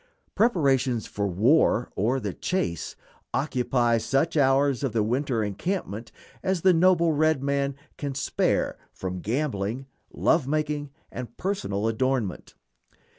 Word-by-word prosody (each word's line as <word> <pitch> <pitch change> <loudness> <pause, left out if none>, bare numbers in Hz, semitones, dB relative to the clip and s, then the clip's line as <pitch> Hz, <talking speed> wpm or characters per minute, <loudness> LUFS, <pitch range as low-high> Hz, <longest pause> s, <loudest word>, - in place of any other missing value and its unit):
Preparations 135 - +2
for 100 0 -2
war 115 - +3
or 120 +7 +1
the 105 -6 -4
chase 85 - -2 0.4
occupy 125 -4 +1
such 135 +8 0
hours 140 -2 +3
of 130 -5 -1
the 110 -2 +2
winter 125 0 0
encampment 110 - -3 0.3
as 190 -2 0
the 185 +1 +5
noble 170 -1 +4
red 155 -2 +2
man 140 -1 0 0.2
can 140 -2 -3
spare 135 - 0
from 90 -1 -5
gambling, 120 - -2 0.3
love 160 -5 +2
making, 150 -1 -1 0.2
and 120 -2 -7
personal 180 - -1
adornment. 115 -3 -1
135 Hz, 125 wpm, -26 LUFS, 115-155 Hz, 0.4 s, the